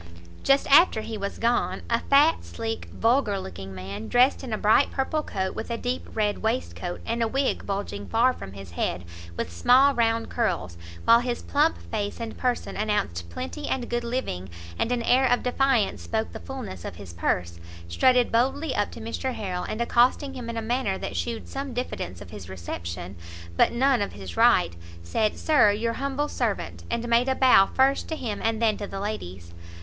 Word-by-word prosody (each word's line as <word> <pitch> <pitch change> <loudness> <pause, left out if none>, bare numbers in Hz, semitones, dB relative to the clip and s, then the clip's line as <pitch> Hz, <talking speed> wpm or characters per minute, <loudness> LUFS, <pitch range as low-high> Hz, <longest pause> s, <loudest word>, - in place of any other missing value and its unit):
Just 275 0 +3
after 290 -6 +6
he 225 - -5
was 200 -1 -4
gone, 235 +1 0
a 230 0 +1
fat, 290 +6 +4
sleek, 225 0 -5
vulgar 225 -4 +2
looking 95 - -8
man, 100 +3 -6
dressed 255 +3 +3
in 255 - -6
a 215 - 0
bright 215 +7 +4
purple 285 +3 -1
coat, 190 -9 -3
with - - -6
a 235 - -2
deep 245 +2 -3
red 210 -2 0
waistcoat, 220 -6 -3
and 230 +1 -1
a 230 - +2
wig 270 +4 -1
bulging 195 - -4
far 250 +3 +3
from 95 - -9
his 95 -3 -10
head 85 0 -2 0.3
with 90 - -3
small 260 - +5
round 230 -2 +1
curls, 155 - -1 0.3
while 230 +1 +7
his 240 0 -3
plump 300 +3 +2
face 205 0 -2
and 230 -1 -5
person 250 -1 -2
announced 195 - -1
plenty 85 0 -5
and 250 -2 -2
good 240 0 0
living, 235 - -3 0.3
and 235 - 0
an 245 -1 0
air 260 +3 +4
of 245 - +2
defiance 250 -4 +1
spoke 220 0 -2
the - - -6
fullness 255 - -7
of - - -6
his 95 -2 -10
purse, 85 0 -1 0.3
strutted 250 - +3
boldly 265 +5 +1
up 205 - +1
to - - -10
Mr 230 +3 -3
Harrel, 185 -4 -3
and 220 - -3
accosting 250 +4 +2
him 245 -3 -6
in 230 - -4
a 225 - -2
manner 225 -4 0
that - - -5
shewed 235 -2 -3
some 275 -2 -5
diffidence 95 - -4
of 90 - -11
his 100 -4 -9
reception, 85 0 -6 0.4
but - - +4
none 260 0 +2
of 200 - -2
his 95 -4 -8
right, 85 +1 +4 0.3
said 210 - 0
"Sir 300 -9 +4
your 225 +3 0
humble 275 +3 -2
servant." - - -3
And 235 0 -2
made 235 +2 +3
a 265 - +2
bow 250 -8 +6
first 270 +1 +2
to 320 - -2
him, 230 -8 -4
and 225 -1 +1
then 220 -2 +2
to 205 - -5
the 195 - -6
ladies. 95 - -6
225 Hz, 195 wpm, -26 LUFS, 180-255 Hz, 0.4 s, while